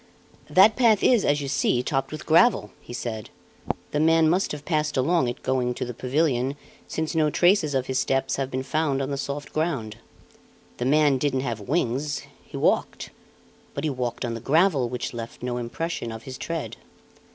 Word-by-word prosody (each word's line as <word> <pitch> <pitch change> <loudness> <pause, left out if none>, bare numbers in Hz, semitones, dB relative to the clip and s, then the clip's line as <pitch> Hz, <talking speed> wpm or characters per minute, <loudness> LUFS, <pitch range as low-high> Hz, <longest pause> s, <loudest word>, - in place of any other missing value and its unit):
"That 205 +4 +6
path 230 -5 +4
is 240 -5 +4
as 145 0 +2
you 140 - -4
see, 130 -2 +1
topped 135 -1 -1
with 155 - -7
gravel," 165 - +4
he - - -12
said; 115 -3 -5 0.6
"the 150 - 0
man 160 +1 +4
must 180 +5 +1
have 150 -1 -7
passed 150 -3 0
along 150 +1 +2
it 120 +1 -5
going 125 -2 0
to - - -3
the 125 - -5
pavilion, 130 +1 0 0.3
since 160 -1 -3
no 155 -2 +2
traces 175 -3 +3
of 130 -1 +1
his 130 0 -1
steps 135 0 0
have 135 -1 -2
been 130 0 -3
found 150 -1 0
on 135 +1 -2
the - - -1
soft 140 +1 -5
ground. 135 -9 -2 0.8
The 120 - -2
man 145 -1 +4
didn't 135 -1 0
have 120 -4 -3
wings; 140 - -1 0.2
he - - -9
walked; - - 0 0.6
but 140 - -3
he 155 - 0
walked 125 -3 -3
on 120 - -3
the 115 - -5
gravel 145 - +2
which 125 0 -4
left 115 0 -7
no 125 -1 -2
impression 120 +1 -4
of 110 0 -8
his 130 +1 -8
tread. 165 -2 -4
140 Hz, 190 wpm, -25 LUFS, 125-160 Hz, 0.8 s, That